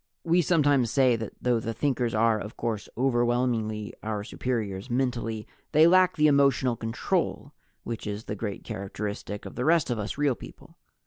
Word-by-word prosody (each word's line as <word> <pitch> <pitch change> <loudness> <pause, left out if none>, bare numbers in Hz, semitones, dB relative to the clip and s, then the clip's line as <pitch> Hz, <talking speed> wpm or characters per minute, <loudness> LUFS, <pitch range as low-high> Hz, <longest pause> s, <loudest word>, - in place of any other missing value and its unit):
We 170 +2 +3
sometimes 145 -7 +3
say 130 -2 +4
that 110 -1 -6
though 125 -2 +1
the 115 0 -4
Thinkers 125 -3 0
are 110 0 +3
of 105 +2 -8
course 110 -3 -3
overwhelmingly 120 -4 0
our 105 -1 -3
superiors 110 -2 -3
mentally, 120 -3 -1 0.3
they 155 +2 +7
lack 185 +1 +5
the 150 - +3
emotional 140 -4 +4
control 115 0 -2 0.3
which 115 -2 -5
is 105 +1 -4
the - - -5
great 105 -1 -5
characteristic 105 +1 -5
of - - -8
the 125 - -3
rest 160 -3 +3
of 120 - -1
us 105 +5 -4
Real 145 -2 +2
People. - - -13
120 Hz, 170 wpm, -27 LUFS, 110-135 Hz, 0.3 s, they